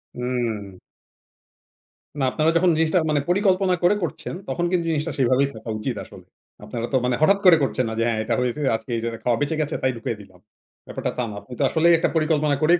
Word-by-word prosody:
উম 115 Hz, -6 st, -3 dB, 1.4 s
না -, -, 0 dB
আপনারা 155 Hz, +4 st, +2 dB
যখন 180 Hz, +1 st, +3 dB
জিনিসটা 160 Hz, +2 st, +2 dB
মানে 150 Hz, -1 st, +2 dB
পরিকল্পনা 190 Hz, -1 st, +2 dB
করে 190 Hz, +4 st, +5 dB
করছেন। 170 Hz, -, -4 dB
তখন 170 Hz, +6 st, -1 dB
কিন্তু 175 Hz, -2 st, +1 dB
জিনিসটা 155 Hz, +1 st, -1 dB
সেভাবেই 130 Hz, +2 st, +3 dB
থাকা 110 Hz, +1 st, -9 dB
উচিত -, -, -3 dB
আসলে। -, -, -14 dB, 0.4 s
আপনারা 115 Hz, 0 st, -4 dB
তো -, -, +5 dB
মানে 125 Hz, -1 st, +1 dB
হঠাৎ 195 Hz, +5 st, +4 dB
করে 170 Hz, -3 st, +8 dB
করছেন 130 Hz, -2 st, 0 dB
না 110 Hz, -, -4 dB
যে -, -, +2 dB
হ্যাঁ 110 Hz, -2 st, 0 dB
এটা -, -, -1 dB
হয়েছে 125 Hz, +4 st, -2 dB
আজকে 110 Hz, +2 st, -7 dB, 0.3 s
খাওয়া 120 Hz, -2 st, +2 dB
বেঁচে 145 Hz, +2 st, 0 dB
গেছে 150 Hz, 0 st, -2 dB
তাই 130 Hz, -, +3 dB
ঢুকিয়ে 115 Hz, -1 st, -4 dB
দিলাম 95 Hz, -2 st, -17 dB, 0.5 s
ব্যাপারটা -, -, -3 dB
তা 125 Hz, -, 0 dB
না। -, -, -7 dB
আপনি 115 Hz, +5 st, -12 dB
তো -, -, +2 dB
আসলেই 170 Hz, +1 st, +4 dB
একটা 165 Hz, -, +1 dB
পরিকল্পনা 155 Hz, -2 st, +2 dB
করেই 170 Hz, +3 st, +4 dB
145 Hz, 200 wpm, -23 LUFS, 120-165 Hz, 1.4 s, করে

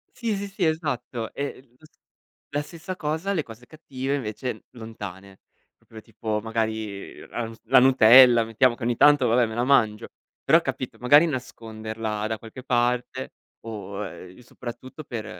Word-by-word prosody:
Sì, 230 Hz, -4 st, -2 dB
sì, 200 Hz, +1 st, -4 dB
sì 195 Hz, -2 st, -2 dB
esatto, 125 Hz, -8 st, -2 dB
e 140 Hz, -, -3 dB
e 125 Hz, -2 st, -21 dB
lo 155 Hz, -, -19 dB
s -, -, -21 dB, 0.6 s
e 145 Hz, -, -2 dB
la -, -, +1 dB
stessa 170 Hz, +4 st, -8 dB
cosa, 160 Hz, +4 st, -2 dB
le 165 Hz, -5 st, 0 dB
cose 115 Hz, 0 st, -13 dB
cattive 140 Hz, -3 st, -4 dB
invece 125 Hz, -1 st, -5 dB
lontane, 100 Hz, -5 st, -9 dB, 0.4 s
proprio 110 Hz, -1 st, -14 dB
tipo 110 Hz, -1 st, -4 dB
magari 110 Hz, -2 st, -4 dB
ras 115 Hz, -1 st, -6 dB
la 130 Hz, +4 st, +6 dB
nutella, 125 Hz, -1 st, +7 dB
mettiamo 115 Hz, +3 st, +2 dB
che 120 Hz, -, -10 dB
ogni 120 Hz, 0 st, +1 dB
tanto, 145 Hz, 0 st, +5 dB
vabbè, 120 Hz, +1 st, +3 dB
me 110 Hz, -1 st, -6 dB
la 120 Hz, -, 0 dB
mangio; 115 Hz, -5 st, +2 dB, 0.4 s
però 165 Hz, +5 st, +5 dB
capito, 135 Hz, -4 st, -5 dB
magari 145 Hz, +6 st, +6 dB
nasconderla 110 Hz, -5 st, -5 dB
da 110 Hz, 0 st, -3 dB
qualche 115 Hz, +3 st, -11 dB
parte 125 Hz, +1 st, -1 dB, 0.3 s
o 105 Hz, -3 st, -7 dB
uhm, 90 Hz, -2 st, -10 dB
soprattutto 125 Hz, +4 st, -9 dB
per 115 Hz, -6 st, -6 dB
120 Hz, 165 wpm, -25 LUFS, 110-140 Hz, 0.6 s, nutella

